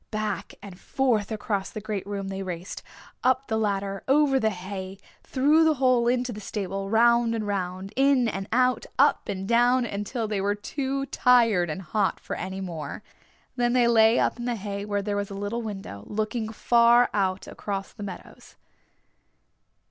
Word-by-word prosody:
Back 215 -2 -3
and 195 -3 -10
forth 240 -7 0
across 205 -2 -2
the - - -6
great 210 -2 -4
room 200 -1 -4
they 195 0 -4
raced, 180 -1 -6 0.4
up 260 +1 +2
the 220 - -1
ladder, 195 -2 -1
over 275 -1 +4
the 220 - +2
hay, 190 0 -6 0.2
through 295 +5 +3
the 320 -1 +3
hole 255 -3 +3
into 245 0 0
the 210 - -8
stable, 195 -1 -4
round 235 +1 +4
and 220 -2 -2
round, 190 0 -3
in 270 -2 +3
and 195 -3 -4
out, 255 +1 +2
up - - +3
and 195 -1 -3
down 245 +2 +3
until 215 +2 -3
they 210 -2 -2
were 205 +1 0
too 275 +5 -3
tired 230 -10 +3
and 170 +5 -5
hot 205 +1 0
for - - -5
any 190 +1 -5
more. 170 0 -6 0.5
Then 240 -1 +1
they 245 -2 +4
lay 225 0 +5
up - - +1
in 240 - -4
the 245 -1 -1
hay 200 -1 -5
where 205 -1 -2
there 205 0 -2
was 205 -1 -2
a 200 - -7
little 205 +4 -3
window, 195 - -7
looking 220 +1 -2
far 235 +2 +4
out 190 -2 0
across 195 -1 -5
the 215 - -12
meadows. 200 - -9
215 Hz, 180 wpm, -26 LUFS, 195-240 Hz, 0.5 s, lay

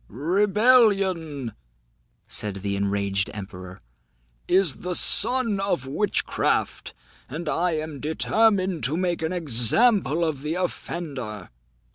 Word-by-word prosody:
"Rebellion," 190 - +2 0.7
said 105 -2 -2
the 100 0 -1
enraged 100 0 -1
emperor, 95 -2 -9 0.7
"is 185 -6 +3
the 180 0 -3
son 240 -2 +3
of 185 -9 -1
witchcraft, 185 +10 -1 0.3
and 160 +5 -6
I 170 +3 0
am 155 -2 -4
determined 185 - +1
to 145 +6 0
make 175 -2 -1
an 160 +1 -2
example 170 - +2
of 150 -4 -3
the 150 +3 -3
offender." 140 - -5
160 Hz, 105 wpm, -24 LUFS, 125-190 Hz, 0.7 s, is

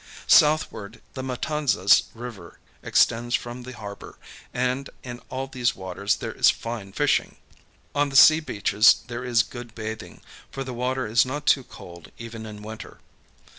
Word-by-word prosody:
Southward, 150 -8 +3
the 130 - -5
Matanzas 130 -7 +2
River 115 -8 -9 0.2
extends 120 +1 +2
from 120 +1 -5
the 130 +1 -9
harbor; 100 -1 -9 0.3
and 125 +2 -1
in 120 -1 -7
all 130 +1 -3
these 130 -2 -1
waters 95 +2 -2
there - - -5
is - - +4
fine 115 -4 -4
fishing. - - 0 0.6
On 145 0 +1
the 135 - -8
sea 155 +4 +8
beaches 105 -7 +3
there 120 0 -6
is 120 -2 +2
good 120 -1 -10
bathing, 110 0 -7 0.3
for 135 - -5
the 130 -1 -6
water 125 +2 -2
is 110 +2 +3
not 145 +3 -5
too 135 - +4
cold 85 -7 -13
even 115 -1 -8
in 105 -1 -10
winter. 110 +1 -9
120 Hz, 155 wpm, -24 LUFS, 110-130 Hz, 0.6 s, sea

